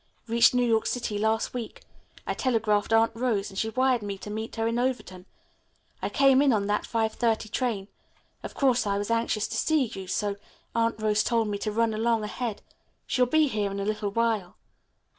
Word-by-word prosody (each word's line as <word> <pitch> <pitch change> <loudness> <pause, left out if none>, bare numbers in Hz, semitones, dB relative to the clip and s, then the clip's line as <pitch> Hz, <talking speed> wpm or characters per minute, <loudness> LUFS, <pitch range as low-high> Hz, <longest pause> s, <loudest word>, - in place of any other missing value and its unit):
Reached 235 +2 +4
New 245 0 +3
York 225 -2 +2
City 225 -4 -2
last 220 +1 0
week. 240 -3 -6 0.4
I - - -1
telegraphed 225 -5 0
Aunt 225 0 +4
Rose, 225 -4 -1
and 195 - -5
she 220 - 0
wired 255 0 +2
me 200 -1 -4
to 210 - -8
meet 220 +1 -5
her 225 -1 -1
in 230 +1 0
Overton. 240 -8 -3 0.7
I - - -1
came 275 -1 +4
in 285 -2 +4
on 210 -3 +1
that 210 +1 0
5.30 225 -1 0
train. 225 -7 -1 0.5
Of - - -8
course 250 -5 +2
I 200 0 +1
was 205 +2 -3
anxious 230 -2 0
to - - -3
see 315 -3 +2
you, 195 -4 -8
so 200 +2 -1 0.4
Aunt 230 -1 0
Rose 215 -1 +2
told 230 -2 +1
me 205 -1 -3
to 215 - -2
run 225 +1 +1
along 225 0 +1
ahead. 220 0 -4 0.4
She'll 250 -1 +2
be 310 +3 +3
here 210 -6 -1
in 200 0 -5
a 200 - -2
little 210 0 -1
while." 220 -4 -1
225 Hz, 200 wpm, -27 LUFS, 210-240 Hz, 0.7 s, Reached